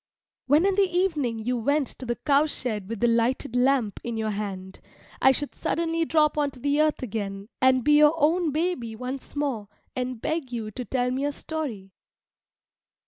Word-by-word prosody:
When 295 +6 +4
in 395 - +3
the 390 -1 +3
evening 325 -10 0
you 245 +3 -1
went 285 +5 +1
to 255 - -7
the 240 - 0
cow 285 +4 +2
shed 215 -9 -4
with 230 -1 -5
the 240 - +4
lighted 235 +2 +1
lamp 250 -5 +2
in 235 -1 -3
your 220 -1 -1
hand, 195 -2 -5 0.4
I 265 - +7
should 290 +2 -2
suddenly 330 0 -1
drop 305 -1 +2
on 290 -1 +2
to 260 - -15
the 285 +3 +2
earth 305 -3 +1
again 200 -3 -4
and 260 -1 +4
be 295 +2 +5
your 300 +1 +6
own 325 +3 +2
baby 295 -8 -2
once 255 +5 -6
more, 270 -8 -2 0.3
and 255 -1 -3
beg 310 -1 -2
you 225 -3 -4
to 250 - -5
tell 250 0 0
me 265 +2 -1
a 290 - 0
story. 270 -12 -5
260 Hz, 190 wpm, -26 LUFS, 230-300 Hz, 0.4 s, I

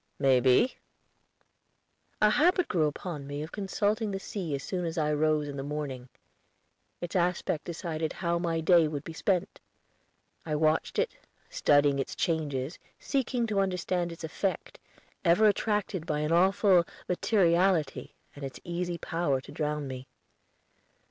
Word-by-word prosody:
"May 135 -2 +4
be." 130 - +3 1.5
A 210 - +6
habit 355 - +3
grew 160 -4 +2
upon 150 -1 -5
me 145 +1 -4
of 155 - -8
consulting 210 +2 -1
the 195 -1 -3
sea 180 -7 -4
as 135 - -5
soon 180 -2 -3
as 165 0 -3
I 150 -1 +1
rose 155 0 +1
in 140 -1 -6
the - - -3
morning. 140 -4 -5 0.9
Its 175 +1 -5
aspect 175 -3 0
decided 165 -2 -3
how 170 -1 -1
my 165 -2 -1
day 165 0 +5
would 145 -2 -4
be 165 - -8
spent. 180 +1 -1 0.8
I 155 -2 -2
watched 155 +1 +1
it, - - 0 0.4
studying 145 -1 +3
its 135 - -3
changes, 150 -3 -2 0.2
seeking 260 -3 -1
to 210 -3 0
understand 180 -2 0
its 170 - -10
effect, 185 +4 -3 0.4
ever 175 +4 +4
attracted 205 -4 0
by 150 -1 0
an 150 +1 -1
awful 185 +1 +4 0.2
materiality 180 -5 +2 0.2
and 145 - -9
its 135 -1 -6
easy 175 0 -3
power 165 -6 -1
to - - -12
drown 150 -2 -2
me. 130 0 -7
165 Hz, 150 wpm, -29 LUFS, 150-185 Hz, 1.5 s, A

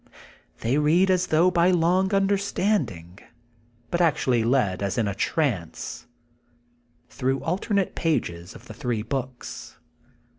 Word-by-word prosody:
They 130 +6 +1
read 170 +6 +3
as 185 -1 +1
thongh 170 +4 +3
by 175 +1 +4
long 180 +2 +2
understanding, 195 - 0 0.7
but 175 - +1
actually 130 -8 +2
led 115 -7 +1
as 100 +2 -2
in 115 -3 +1
a 100 - -1
trance, 105 - -2 1.0
through 135 +1 -2
alternate 195 +3 -1
pages 90 - -2
of 115 - -13
the - - -10
three 120 -6 -2
books. 130 +1 -6
150 Hz, 120 wpm, -25 LUFS, 115-180 Hz, 1.0 s, by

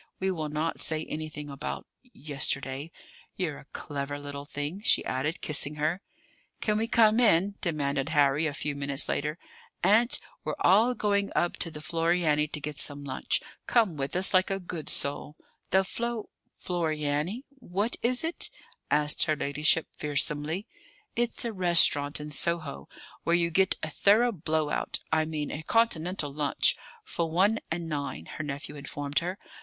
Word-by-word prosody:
We 190 0 +1
will 155 -4 -3
not 155 +2 -2
say 160 0 -1
anything 155 -1 -5
about 140 +1 -5 0.2
yesterday. 140 - -3 0.4
You're 165 -7 -2
a - - -15
clever 145 0 -5
little 145 0 -7
thing," 145 +6 -5
she - - +3
added, 135 +5 -2
kissing 150 -1 0
her. 155 +5 -1 0.6
"Can 210 -1 +1
we 225 - 0
come 225 -1 +5
in?" 200 -4 +4
demanded 145 -5 0
Harry, 145 0 +3
a 145 - -3
few 145 - -2
minutes 140 0 +1
later. 150 +2 -1 0.5
"Aunt, 220 +6 +4 0.2
we're - - -2
all 225 +6 +5
going 200 -2 +1
up 175 - +1
to 165 - -1
the 150 -2 -9
Floriani 165 -2 +1
to 150 - -4
get 150 0 -5
some 145 -1 0
lunch. 135 -2 -1 0.2
Come 220 -9 +3
with 140 +1 -3
us, 185 +2 +5
like 185 0 +4
a 195 0 -1
good 175 -4 -6
soul!" 145 +1 -2 0.3
"The 190 +1 +4
Flo 235 +3 -4 0.3
Floriani! 160 - -1 0.2
What 205 0 -1
is 245 +3 +1
it?" 330 +2 +1 0.4
asked 150 0 +2
her 155 - +1
ladyship 150 +2 +2
fearsomely. 150 +5 0 0.5
"It's 240 +1 0
a 230 - -2
restaurant 170 -6 +5
in 150 0 -6
Soho, 155 - 0 0.3
where 170 - +3
you 170 -1 +1
get 190 +3 +3
a 155 - -1
thorough 220 +9 +4
blow 155 -5 -1
out - - -1
I 160 0 +3
mean 155 -2 -3
a 150 - -4
Continental 175 -7 +1
lunch 145 -1 +3 0.3
for 170 - -2
one 195 +7 +3
and 165 0 -3
nine," 140 - -4
her 160 - -3
nephew 145 0 -5
informed 145 0 -2
her. 180 +3 -4
155 Hz, 160 wpm, -28 LUFS, 145-190 Hz, 0.6 s, come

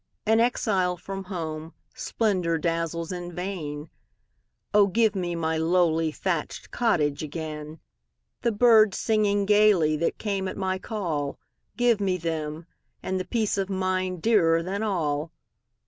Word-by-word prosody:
An 220 +1 +4
exile 195 -7 +1
from 195 +2 -7
home, 160 -3 -5 0.2
splendor 185 -7 0
dazzles 165 +1 -2
in 175 -1 -5
vain:O, 180 +3 -3
give 215 +1 +2
me 175 -2 -2
my 160 -1 -1
lowly 165 -1 +2
thatched 170 -1 -3
cottage 155 -12 +1
again! 155 0 -6 0.6
The 235 - +1
birds 220 -2 +5
singing 205 -2 +1
gayly 205 -7 +4
that 165 - -1
came 195 -3 -2
at - - -5
my 190 -1 -1
call;—Give 205 +5 -2
me 190 -2 +1
them,—and 165 +3 -5
the 185 - -3
peace 215 -1 0
of 195 0 -2
mind 185 -2 -1
dearer 165 -7 +3
than 195 +4 -3
all! 160 -7 -1
180 Hz, 125 wpm, -26 LUFS, 160-205 Hz, 0.6 s, birds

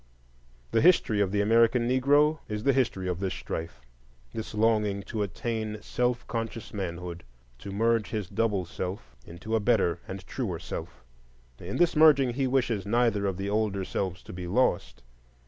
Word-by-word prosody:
The 115 - +3
history 145 - +4
of 95 -2 +1
the 100 0 +1
American 115 +3 +4
Negro 145 +4 +3
is 105 0 -3
the 140 - +4
history 115 -8 0
of 90 -1 -2
this 95 -3 -2
strife,—this - - -8
longing 105 -2 +2
to 110 +2 -4
attain 110 +1 -3
self 125 0 -1
conscious 115 -1 -5
manhood, 90 -3 -5 0.4
to 100 - -8
merge 115 0 +1
his 105 -4 -3
double 105 -4 0
self 85 -8 -6
into 105 +7 -4
a - - +3
better 100 -6 +2
and 95 -1 -7
truer 100 -8 -3
self. 80 -6 -7 0.6
In 90 +3 -5
this 175 -1 +3
merging 145 -5 +6
he 135 +1 0
wishes 120 -6 +1
neither 105 -2 +1
of 95 -2 -2
the 100 +1 -3
older 105 -3 0
selves 90 -2 -3
to - - -10
be 90 0 -6
lost. 85 - 0
105 Hz, 165 wpm, -28 LUFS, 90-115 Hz, 0.6 s, merging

